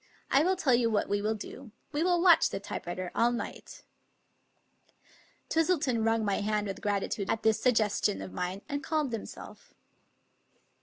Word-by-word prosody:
I 275 - +5
will 370 +4 +2
tell 290 -8 +2
you 235 -1 +3
what 215 -2 0
we 205 0 0
will 215 +1 0
do. 245 +4 -9 0.2
We 295 +1 -1
will 350 0 +3
watch 345 -3 +6
the 195 - -4
typewriter 180 -2 -5
all 235 +1 +3
night." 240 - -6 1.6
Twistleton 315 -8 +1
wrung 225 0 +1
my 200 -1 +1
hand 210 0 0
with 195 -1 -5
gratitude 200 0 -1
at 225 - -1
this 220 -1 +2
sug 250 -2 +3
gestion 210 - +1
of 95 -1 -9
mine, 180 - -4
and 285 0 -3
calmed 305 -3 -1
himself. 225 - -8
225 Hz, 165 wpm, -30 LUFS, 205-285 Hz, 1.6 s, watch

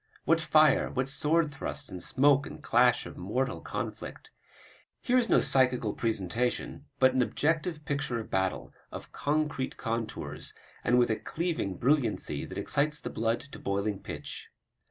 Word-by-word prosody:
What 165 0 +3
fire, 155 -1 +4
what 130 0 -1
sword 150 +3 +1
thrusts 140 +1 -5
and 90 - -8
smoke 140 +5 +4
and - - -10
clash - - +4
of - - -9
mortal 130 +8 -2
conflict! - - -6 0.7
Here 255 0 +3
is 235 - 0
no - - +5
psychical 125 -5 +2
presentation, 115 +5 -2
but 130 -1 +5
an 130 - +3
objective 155 +4 0
picture 140 -4 -1
of 110 - -8
battle, 95 -1 -1 0.2
of - - -8
concrete 150 -2 -1
contours, 115 -1 -4 0.3
and 125 - +3
with 120 -2 +4
a 110 - 0
cleaving 160 - -2
brilliancy 130 -3 +1
that - - -8
excites 150 +1 0
the - - -6
blood 115 +1 0
to 140 - -11
boiling 100 0 -2
pitch. - - -7
130 Hz, 155 wpm, -29 LUFS, 115-150 Hz, 0.7 s, no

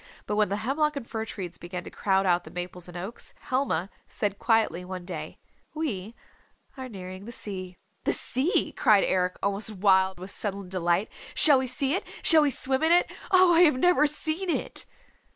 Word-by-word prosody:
But 210 - -2
when 210 -1 +2
the 200 - -1
hemlock 295 +8 0
and 275 -4 -5
fir 220 -1 -4
trees 180 -6 -7
began 175 0 -6
to - - -10
crowd 195 -1 +1
out 175 -1 +2
the - - -11
maples 180 0 -7
and 175 0 -9
oaks, 195 +7 -8
Helma 230 -9 -1 0.2
said 205 -2 -3
quietly 220 -7 +1
one 180 -1 -7
day, 175 -4 -7 0.4
"We 230 -9 -4 0.6
are 260 -1 -7
nearing 185 -2 -9
the 235 - -8
sea." 185 -5 -7 0.3
"The - - +2
sea," 285 - 0
cried 210 -2 +4
Eric 180 -1 0
almost 200 +2 -1
wild 190 -2 +2
with 185 +2 -7
sudden 200 -2 -3
delight. 180 +2 0 0.2
"Shall 290 -4 +7
we 260 - -2
see 270 +3 -1
it? 375 - -1 0.2
Shall 320 -2 +7
we 295 - +3
swim 265 0 0
in 320 +1 +3
it? 350 +1 +4 0.2
Oh, 370 -3 +6
I 330 - +5
have 300 -7 +5
never 305 0 +4
seen 315 +5 -1
it!" - - 0
205 Hz, 190 wpm, -26 LUFS, 185-275 Hz, 0.6 s, Shall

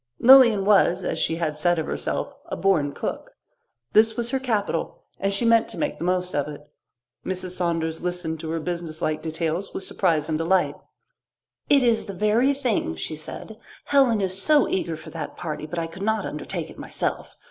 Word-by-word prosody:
Lilian 235 -6 +7
was, 190 -3 +4
as - - -2
she 165 - 0
had 155 -3 -2
said 175 +2 +2
of 160 - -1
herself, - - -3
"a - - -4
born 165 -7 +2
cook." - - -5 0.6
This 220 +1 +4
was 235 0 -2
her 265 - +1
capital, 210 -9 -2 0.2
and 195 - 0
she 200 +4 +1
meant 230 0 +4
to - - -9
make 295 - -2
the - - -4
most 180 0 0
of 145 -1 0
it. 150 0 -9 0.6
Mrs. 185 -1 -3
Saunders 165 -3 -1
listened 175 -3 -2
to 160 - -6
her 165 +1 -1
businesslike 160 -2 -3
details 165 +3 -3
with - - -3
surprise 160 -7 0
and 155 -1 -1
delight. 180 +3 +2 1.0
"It 280 -2 +5
is 235 -2 +2
the 200 - -6
very 220 +8 +2
thing," 240 - -1
she 80 - -5
said. 210 +7 -9 0.3
"Helen 260 -7 +3
is 190 0 -1
so 300 +1 +4
eager 165 -4 -2
for 160 0 -11
that 155 -2 -6
party, 155 -2 -5
but 175 - -6
I 165 - -1
could 165 +3 -10
not 220 +2 0
undertake - - -5
it - - -14
myself. - - -3
180 Hz, 190 wpm, -24 LUFS, 160-220 Hz, 1.0 s, Lilian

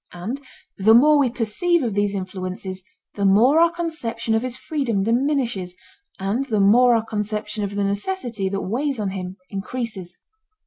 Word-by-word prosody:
And 215 +11 -5 0.4
the 220 +3 +6
more 295 +4 +6
we 270 -3 +3
perceive 260 - 0
of 230 -4 -1
these 205 0 0
influences 185 0 -5 0.3
the 200 - -3
more 225 +10 +5
our 335 0 +6
conception 320 -10 -3
of 225 - +2
his 255 0 -4
freedom 260 -10 -1
diminishes 235 -6 0 0.4
and 200 +7 -1
the 220 -6 0
more 235 +5 +5
our 225 -1 0
conception 210 0 -3
of 200 0 -4
the 205 - 0
necessity 205 - -2
that 195 0 -2
weighs 265 +5 -2
on 200 -2 -1
him 185 0 -6
increases. 200 -3 -5
220 Hz, 165 wpm, -22 LUFS, 195-255 Hz, 0.4 s, the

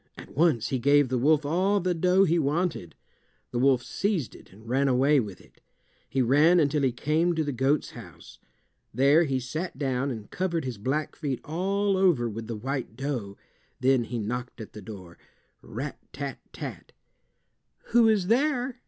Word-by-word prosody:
At - - -12
once 150 -7 +2
he 130 - -1
gave 140 +1 +4
the 130 - 0
wolf 150 +3 +3
all 185 +7 +2
the 180 -1 0
dough 180 +3 +3
he 170 -2 +2
wanted. 155 - -1 0.6
The 120 - -2
wolf 130 -2 +3
seized 195 - -2
it - - -16
and 110 +4 -16
ran 135 +3 +1
away 135 +3 +4
with 105 -6 -5
it. - - -22 0.5
He 130 0 +1
ran 150 +8 +5
until 150 -1 +2
he 135 -2 +2
came 155 +7 0
to 160 - 0
the 145 - -2
goat's 135 +3 0
house. - - -13 0.5
There 140 +7 +4
he 135 -3 -1
sat 155 +7 -5
down 135 -1 -1
and 110 -5 -7
covered 170 -5 -2
his 125 -5 -5
black 140 +7 -2
feet 140 -5 -3
all 195 +5 0
over 175 -11 +3
with 115 0 -6
the 115 - -4
white 130 +1 -4
dough. 125 -8 -4 0.4
Then 130 -2 +3
he 120 - -5
knocked 120 +3 -4
at 110 - -9
the 105 - -9
door—rat 95 -4 -10
tat - - -6
tat! - - -8 1.0
"Who 235 -1 +5
is 210 -4 +2
there?" 250 +2 +1
140 Hz, 175 wpm, -27 LUFS, 125-170 Hz, 1.0 s, ran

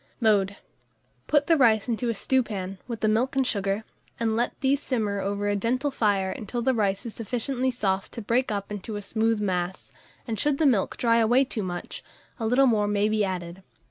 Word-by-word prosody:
Mode. 200 -4 +2 0.7
Put 295 -1 +3
the 330 +1 +4
rice 225 -5 +4
into 240 0 -1
a 230 - -1
stewpan, 200 -6 -1
with 235 -3 -5
the 215 - +2
milk 230 +6 +1
and 265 -1 +2
sugar, 200 -1 -1 0.4
and 225 -1 +1
let 240 +2 -1
these 275 +1 +2
simmer 215 -7 -1
over 200 +1 -2
a 205 - +1
gentle 255 +7 0
fire 200 -6 +1
until 235 +4 -4
the 260 +1 +3
rice 200 -1 0
is 230 - -5
sufficiently 250 +3 -2
soft 195 -6 -1
to 235 - -5
break 235 +3 +1
up 200 0 -3
into 210 +1 -5
a 205 - -4
smooth 225 +2 0
mass, 185 -2 -2 0.4
and 220 -3 -3
should 290 +2 +2
the 315 - +2
milk 235 -9 +2
dry 230 -1 +3
away 240 +4 +4
too 225 - -4
much, 175 -2 -5 0.4
a 225 - -1
little 255 +4 +4
more 215 -5 +3
may 205 0 +1
be 215 -1 +1
added. 180 -1 -4
220 Hz, 205 wpm, -26 LUFS, 200-245 Hz, 0.7 s, the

